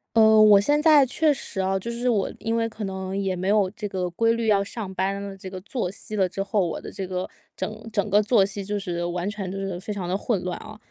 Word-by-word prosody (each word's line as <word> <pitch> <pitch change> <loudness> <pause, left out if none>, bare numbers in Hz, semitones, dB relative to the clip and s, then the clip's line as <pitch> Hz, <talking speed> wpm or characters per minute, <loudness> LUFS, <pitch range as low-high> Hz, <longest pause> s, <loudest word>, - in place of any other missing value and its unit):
呃， 220 -1 +7
我 210 -2 +8
现 290 +8 +2
在 300 -4 +7
确 300 +4 +2
实 205 -7 -4
啊， 190 +1 0
就 230 +5 -6
是 240 +1 -1
我 205 -5 +1
因 225 +1 -2
为 230 0 +1
可 215 -1 -7
能 190 0 -4
也 195 -2 0
没 185 +1 -3
有 205 -2 +3
这 210 0 -5
个 185 -2 -2
规 230 +6 +2
律 230 -1 -2
要 205 -2 +4
上 200 -1 -5
班 195 +2 -1
的 200 -1 -7
这 190 0 -8
个 185 -1 -7
作 210 -3 -3
息 210 +2 -6
了 190 -2 +3
之 195 +2 -3
后。 200 -3 +1
我 - - -4
的 - - -8
这 190 - -5
个， 185 0 -3 0.3
整 220 +1 -5
整 205 0 0
个 205 +2 +5
作 215 -2 +4
息 200 0 -4
就 205 +1 -2
是 175 -3 -3
完 175 +2 -2
全 200 -3 -4
就 195 - -5
是 195 -2 -4
非 205 +3 -5
常 180 -3 -4
地 190 - +1
混 205 -3 -1
乱 180 -1 -3
啊， 215 0 -11
200 Hz, 290 characters per minute, -24 LUFS, 190-220 Hz, 0.3 s, 我